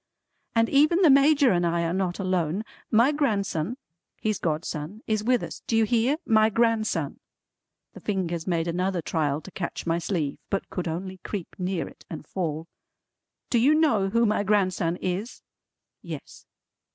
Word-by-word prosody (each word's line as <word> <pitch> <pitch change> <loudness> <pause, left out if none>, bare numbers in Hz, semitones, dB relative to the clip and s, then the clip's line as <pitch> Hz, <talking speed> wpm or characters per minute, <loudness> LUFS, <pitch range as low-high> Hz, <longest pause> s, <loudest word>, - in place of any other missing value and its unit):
"And 230 0 +4
even 305 +8 +4
the 320 - +7
Major 280 0 +5
and 175 -2 +2
I 170 0 +1
are 165 0 -1
not 185 -2 -1
alone. 185 0 0 0.3
My 235 +6 +5
grandson 215 - -1 0.4
his 215 -2 -1
godson 160 +4 -3
is 215 -1 0
with 250 +2 +2
us. - - -7
Do 225 - +2
you 225 - +5
hear? 240 +5 +2
My 220 -1 +4
grandson." 225 0 0 0.7
The - - -10
fingers 175 -5 -2
made 170 -2 0
another 180 0 -1
trial 150 -2 0
to 190 - -11
catch 175 - -5
my 165 0 +1
sleeve, 165 -5 -2
but 195 - -2
could 180 -2 -3
only 185 +3 -4
creep 190 -1 -5
near 185 -1 -2
it - - -15
and 155 -2 -7
fall. 160 -2 -3 0.8
"Do 240 - +4
you 280 +6 +5
know 230 -12 +3
who 230 +3 +3
my 210 -1 +2
grandson 185 -4 +1
is?" 185 +6 -4 0.6
Yes. - - -9
195 Hz, 165 wpm, -26 LUFS, 170-230 Hz, 0.8 s, the